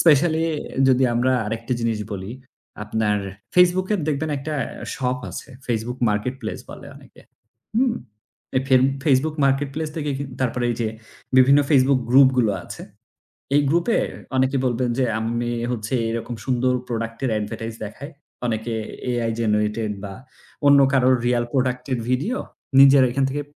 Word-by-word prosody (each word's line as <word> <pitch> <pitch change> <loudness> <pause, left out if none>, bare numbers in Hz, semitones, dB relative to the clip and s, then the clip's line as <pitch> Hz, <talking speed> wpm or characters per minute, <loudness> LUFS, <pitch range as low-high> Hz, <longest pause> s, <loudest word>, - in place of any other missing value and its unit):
specially 160 +1 +4 0.4
যদি 130 0 +4
আমরা 125 +2 +2
আরেকটা 115 +3 -3
জিনিস 115 -2 0
বলি, 95 +2 -5 0.5
আপনার 105 0 0 0.4
Facebook-এ 180 +3 +4
দেখবেন 155 +1 -1
একটা 150 +3 -4 0.4
shop 125 -1 -1
আছে - - -8 0.2
Facebook 120 +1 -2
marketplace 110 +3 -3
বলে - - -10
অনেকে। - - -17 0.6
হুম? 245 -1 +3 0.6
এ - - -1
ফেব 130 -1 +5 0.2
Facebook 150 +2 +2
marketplace 145 +3 -1
থেকে 150 -2 -2 0.3
তারপরে 125 -1 0
এই 120 - -2
যে 110 - 0 0.5
বিভিন্ন 135 +2 +6
Facebook 135 -2 +4
group 130 +1 +7
গুলো 110 -4 +3
আছে। - - -9 0.7
এই - - +6
group-এ 170 +8 +2 0.4
অনেকে 130 +1 +2
বলবেন 125 0 0
যে 130 - +3 0.2
আমি 120 +1 -2 0.2
হচ্ছে 115 +1 -3
এইরকম 115 +1 -4
সুন্দর 125 0 +1
product-এর 115 +1 -3
advertise 110 +1 -5
দেখায়। 140 +8 -9 0.3
অনেকে 115 0 -2 0.4
AI 120 -2 0
generated 105 0 0
বা 100 -1 -6 0.5
অন্য 140 0 +7
কারোর 130 -1 +4
real 120 -1 +2
product-এর 130 -1 -1
video 145 - 0 0.4
নিজের 135 0 +8
এখান 135 +2 0
থেকে 145 +2 -2
130 Hz, 140 wpm, -22 LUFS, 115-140 Hz, 0.7 s, নিজের